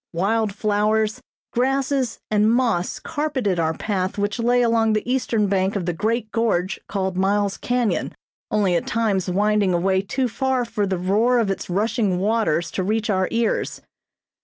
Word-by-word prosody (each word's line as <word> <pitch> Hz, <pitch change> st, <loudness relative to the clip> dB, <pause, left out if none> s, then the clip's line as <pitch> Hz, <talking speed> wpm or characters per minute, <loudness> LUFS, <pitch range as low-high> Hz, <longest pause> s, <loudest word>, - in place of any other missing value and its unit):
Wild 210 Hz, +5 st, +1 dB
flowers, 215 Hz, +1 st, 0 dB, 0.3 s
grasses 265 Hz, -1 st, 0 dB
and 210 Hz, +1 st, +3 dB
moss 230 Hz, -8 st, +1 dB
carpeted 275 Hz, -, -2 dB
our 160 Hz, 0 st, 0 dB
path 190 Hz, -3 st, -2 dB
which 205 Hz, +3 st, -1 dB
lay 245 Hz, +1 st, +3 dB
along 225 Hz, -2 st, +2 dB
the 215 Hz, +2 st, -1 dB
eastern 245 Hz, -4 st, +1 dB
bank 190 Hz, 0 st, 0 dB
of 190 Hz, -4 st, -2 dB
the 175 Hz, -, -1 dB
great 220 Hz, +5 st, -1 dB
gorge 215 Hz, -5 st, 0 dB
called 190 Hz, -2 st, -2 dB
Miles 200 Hz, +1 st, +1 dB
Canyon, 245 Hz, -3 st, -1 dB, 0.3 s
only 200 Hz, -4 st, +2 dB
at -, -, -1 dB
times 205 Hz, -5 st, 0 dB
winding 205 Hz, 0 st, +2 dB
away 190 Hz, +2 st, +2 dB
too 250 Hz, +6 st, -1 dB
far 260 Hz, +2 st, 0 dB
for 215 Hz, -3 st, -2 dB
the 190 Hz, -1 st, -1 dB
roar 210 Hz, +8 st, +2 dB
of 220 Hz, -4 st, +1 dB
its 195 Hz, -, -5 dB
rushing 205 Hz, 0 st, 0 dB
waters 185 Hz, -5 st, 0 dB
to 190 Hz, -, -2 dB
reach 220 Hz, +3 st, 0 dB
our 185 Hz, -1 st, +1 dB
ears. 230 Hz, 0 st, -1 dB
210 Hz, 160 wpm, -22 LUFS, 190-230 Hz, 0.3 s, and